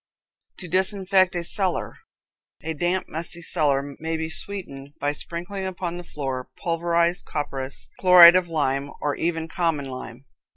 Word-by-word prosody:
To 180 Hz, -, -8 dB
Disinfect 190 Hz, 0 st, +2 dB
a 175 Hz, -, -1 dB
Cellar. 185 Hz, +1 st, -1 dB, 0.7 s
A 160 Hz, -, -3 dB
damp, 175 Hz, +4 st, -1 dB
musty 170 Hz, +2 st, -5 dB
cellar 145 Hz, -4 st, 0 dB
may 160 Hz, 0 st, -2 dB
be 160 Hz, 0 st, -3 dB
sweetened 150 Hz, -7 st, -5 dB
by 145 Hz, +1 st, 0 dB
sprinkling 175 Hz, +5 st, -5 dB
upon 175 Hz, -2 st, -4 dB
the 175 Hz, -, -7 dB
floor 135 Hz, -5 st, -5 dB
pulverized 170 Hz, +1 st, 0 dB
copperas, 135 Hz, -2 st, -4 dB
chloride 180 Hz, -2 st, +9 dB
of 185 Hz, -1 st, +2 dB
lime, 140 Hz, -3 st, -1 dB
or 145 Hz, -1 st, -1 dB
even 165 Hz, -1 st, -2 dB
common 165 Hz, -6 st, -1 dB
lime. 130 Hz, 0 st, -8 dB
170 Hz, 140 wpm, -24 LUFS, 145-180 Hz, 0.7 s, chloride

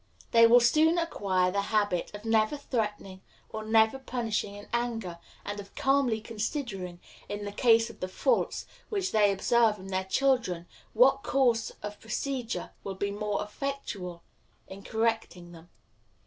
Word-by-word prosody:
They 230 Hz, 0 st, +7 dB
will 240 Hz, +2 st, +7 dB
soon 310 Hz, +8 st, +4 dB
acquire 190 Hz, -, +1 dB
the 200 Hz, +1 st, 0 dB
habit 205 Hz, -4 st, 0 dB
of 205 Hz, +2 st, -10 dB
never 225 Hz, +4 st, +2 dB
threatening, 210 Hz, -8 st, -3 dB, 0.3 s
of 215 Hz, 0 st, -5 dB
never 220 Hz, +3 st, +4 dB
punishing 230 Hz, -6 st, -2 dB
in 205 Hz, 0 st, -11 dB
anger, 225 Hz, -8 st, -2 dB, 0.3 s
and 205 Hz, 0 st, -4 dB
of 200 Hz, 0 st, -11 dB
calmly 270 Hz, -5 st, +2 dB
considering, 215 Hz, -, -4 dB, 0.3 s
in 205 Hz, 0 st, -4 dB
the 205 Hz, -, -4 dB
case 230 Hz, +1 st, +4 dB
of -, -, -19 dB
the 185 Hz, -, -3 dB
faults 470 Hz, -, 0 dB, 0.2 s
which 395 Hz, -4 st, -1 dB
they 210 Hz, -2 st, +4 dB
observe 225 Hz, +2 st, +3 dB
in 190 Hz, 0 st, -10 dB
their 190 Hz, 0 st, -1 dB
children, 230 Hz, -6 st, +1 dB, 0.3 s
what 270 Hz, +4 st, +5 dB
course 245 Hz, -5 st, +1 dB
of 210 Hz, 0 st, -6 dB
procedure 245 Hz, +2 st, -3 dB
will 195 Hz, -, -5 dB
be 200 Hz, +1 st, -2 dB
most 205 Hz, 0 st, -2 dB
effectual 210 Hz, -7 st, -5 dB, 0.4 s
in 190 Hz, +1 st, -10 dB
correcting 220 Hz, -6 st, -2 dB
them. 170 Hz, 0 st, -14 dB
220 Hz, 150 wpm, -29 LUFS, 200-245 Hz, 0.4 s, They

